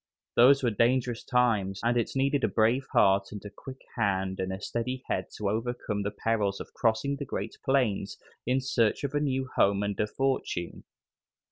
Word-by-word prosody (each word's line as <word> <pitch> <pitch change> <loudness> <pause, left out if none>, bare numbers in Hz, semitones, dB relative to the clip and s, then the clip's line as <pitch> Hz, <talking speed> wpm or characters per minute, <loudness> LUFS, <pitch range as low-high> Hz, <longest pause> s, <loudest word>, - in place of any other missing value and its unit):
Those 135 +3 +6
were 120 - +2
dangerous 120 +2 +1
times, 110 -6 +1
and 120 +1 +2
it 120 +2 -1
needed 135 +1 +1
a - - +4
brave 115 +5 +2
heart 100 0 +3
and 105 0 -8
a 105 - -7
quick 130 +3 -11
hand 95 -4 0
and 95 0 -2
a 95 - -4
steady 125 +5 -3
head 95 - -1
to 105 - -2
overcome 110 -1 -2
the 100 - -1
perils 105 -2 -1
of - - -9
crossing 120 +5 0
the 140 - -5
great - - -4
plains 125 -8 0 0.3
in 130 +2 +1
search 120 -3 +1
of 140 0 -2
a 145 - +2
new 135 -2 -1
home 100 0 +3
and 100 -1 -3
a 105 - +1
fortune. 130 -9 -2
115 Hz, 190 wpm, -28 LUFS, 100-130 Hz, 0.3 s, Those